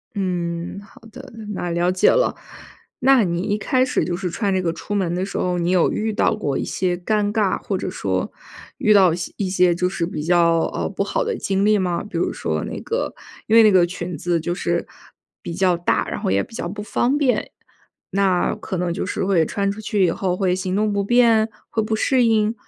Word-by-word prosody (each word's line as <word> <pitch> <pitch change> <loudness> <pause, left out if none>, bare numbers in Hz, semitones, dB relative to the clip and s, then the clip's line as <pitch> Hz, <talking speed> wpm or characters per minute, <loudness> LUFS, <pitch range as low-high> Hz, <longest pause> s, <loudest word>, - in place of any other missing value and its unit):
嗯， 175 -2 -3
好 205 - -18
的， - - -11 0.2
那 175 - -3
了 175 +1 +1
解 185 - +4
了。 - - +2 0.6
那 265 -2 +5
你 170 -2 -1
一 205 +2 -1
开 255 +5 +1
始 255 -10 0
就 175 0 -2
是 180 0 -3
穿 195 +3 -1
这 185 - +1
个 170 -2 0
出 185 +5 -7
门 185 -4 0
的 185 - -1
时 195 - -5
候， 180 -1 0
你 175 +1 0
有 180 -3 +3
遇 220 0 -2
到 215 - +2
过 145 -10 -2
一 - - -2
些 180 -1 -1
尴 205 +3 0
尬， 210 -4 +1
或 195 - -2
者 185 - -4
说 95 - -2 0.5
遇 215 - +3
到 190 -4 +5
些 175 0 -5
一 195 -3 -1
些 180 -1 +3
就 180 +1 0
是 180 -2 -2
比 165 -3 -5
较， 170 0 +3
呃， - - -2
不 - - -2
好 - - -1
的 470 -1 -2
经 195 +1 0
历 215 0 +4
吗？ 180 -2 -1
比 195 -5 -6
如 - - 0
说 - - -3
那 - - -5
个， 475 +2 -2 0.3
因 225 - +3
为 230 - +8
那 215 - +6
个 185 -2 +5
裙 175 -1 -5
子 170 +2 0
就 175 +2 -2
是 - - -1 0.5
比 170 - -6
较 185 0 +2
大， 170 +1 0
然 - - -4
后 - - -1
也 100 +1 +2
比 - - -15
较 175 - -4
不 205 +3 -6
方 245 +6 0
便。 275 -4 +1 0.6
那 190 -2 +1
可 190 - -5
能 175 -1 -1
就 - - -3
是 190 - -2
会 180 -5 +3
穿 200 +3 -1
出 215 +2 -7
去 205 -2 +1
以 170 - +2
后 185 0 -1
会 185 -2 +1
行 185 0 -3
动 210 +1 +1
不 200 - 0
便？ 230 0 +4 0.2
会 220 - 0
不 215 +1 -1
适 255 +3 +2
应？ 220 -1 +2
190 Hz, 250 characters per minute, -21 LUFS, 175-215 Hz, 0.6 s, 为